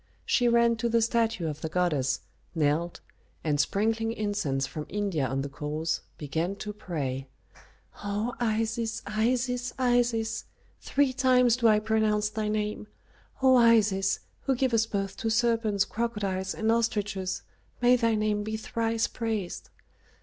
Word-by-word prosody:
She 245 - +3
ran 235 0 +4
to 235 +1 -1
the 230 0 +3
statue 230 -4 +1
of 150 0 -5
the 160 - -3
goddess, 150 -7 0 0.3
knelt, 160 +2 0 0.4
and 150 -2 0
sprinkling 225 +6 +1
incense 200 -12 -1
from 150 +2 -6
India 195 -9 -1
on 135 +1 -1
the - - -3
coals, 150 +3 -3 0.2
began 160 +6 -2
to 210 +1 -6
pray, 135 -9 -4 0.8
"O 205 +4 -2
Isis, 225 0 -1
Isis, 245 +3 0
Isis! 240 -3 +1 0.3
three 280 -2 +1
times 250 -2 +4
do 240 -2 +3
I 215 -1 +6
pronounce 215 -1 +1
thy 215 0 -3
name. 210 0 -2 0.6
O 260 -1 +7
Isis, 215 -5 +4 0.2
who 270 - +2
givest 235 -3 +1
birth 195 -1 -2
to 225 - -1
serpents, 220 -3 +2
crocodiles, 200 -5 -2
and 220 0 +1
ostriches, 205 -5 -1 0.4
may 245 0 +5
thy 230 -2 +2
name 210 -1 0
be 220 +1 -3
thrice 225 +1 -1
praised. 220 -6 -4
215 Hz, 140 wpm, -28 LUFS, 190-230 Hz, 0.8 s, O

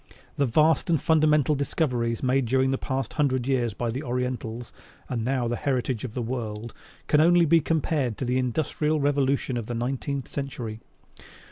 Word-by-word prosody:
The 140 - +1
vast 155 +7 +3
and 165 -3 +3
fundamental 155 -1 +3
discoveries 125 -5 -1
made 130 0 +2
during 130 +2 +2
the 135 - -1
past 135 0 -3
hundred 130 -4 0
years 120 -6 0
by 120 +1 -2
the 130 +4 -4
Orientals 125 -3 -3 0.3
(and 120 -3 -2
now 125 0 0
the 120 - -1
heritage 125 -2 -1
of 120 -4 -6
the 125 - -2
whole 115 - -4
world) 115 -2 -4 0.3
can 150 - +4
only 175 +1 +5
be 165 +1 +5
compared 150 -7 0
to 130 - -3
the 125 +1 +1
Industrial 150 +4 0
Revolution 140 -2 +1
of 115 -2 -4
the 120 - -3
nineteenth 135 +2 -3
century. 120 -6 -5
130 Hz, 175 wpm, -26 LUFS, 120-145 Hz, 0.3 s, only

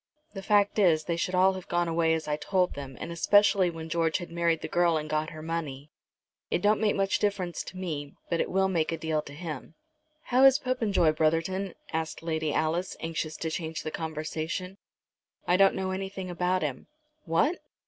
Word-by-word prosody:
"The 195 - -6
fact 205 +1 +3
is 165 -6 +4
they 170 +1 -1
should 180 +2 -1
all 190 +1 +5
have 185 -1 -8
gone 175 0 +1
away 165 -1 +2
as 160 -1 -4
I 150 - +1
told 180 +4 0
them, 135 -2 -8
and 170 - -5
especially 200 +2 +4
when 165 -1 -7
George 165 0 +1
had 175 -2 -8
married 170 -1 +1
the - - -4
girl 175 -2 +2
and 155 0 -4
got 155 +1 -1
her 155 -1 -9
money. 150 -3 -4 0.6
It - - 0
don't 210 +1 +3
make 210 -2 +2
much 195 -1 +1
difference 195 -4 -1
to 185 - -9
me, 150 -6 -4
but 170 - 0
it - - -2
will 190 +1 +2
make 170 -4 0
a 165 - -2
deal 160 -1 -1
to 145 - -12
him." 155 -1 -7 0.5
"How 255 +2 +3
is 270 0 +8
Popenjoy, 225 - +2
Brotherton?" 165 +5 0 0.2
asked 160 0 -3
Lady 160 -2 -1
Alice, 165 +5 -1
anxious 160 -1 -3
to 160 - -3
change 160 -1 -4
the 155 - -4
conversation. 160 +4 -4 0.7
"I 180 - +3
don't 195 +1 +5
know 190 0 -2
anything 190 -1 -4
about 180 0 0
him." 135 -4 -4 0.4
"What!" 195 - +2
170 Hz, 200 wpm, -28 LUFS, 160-190 Hz, 0.7 s, is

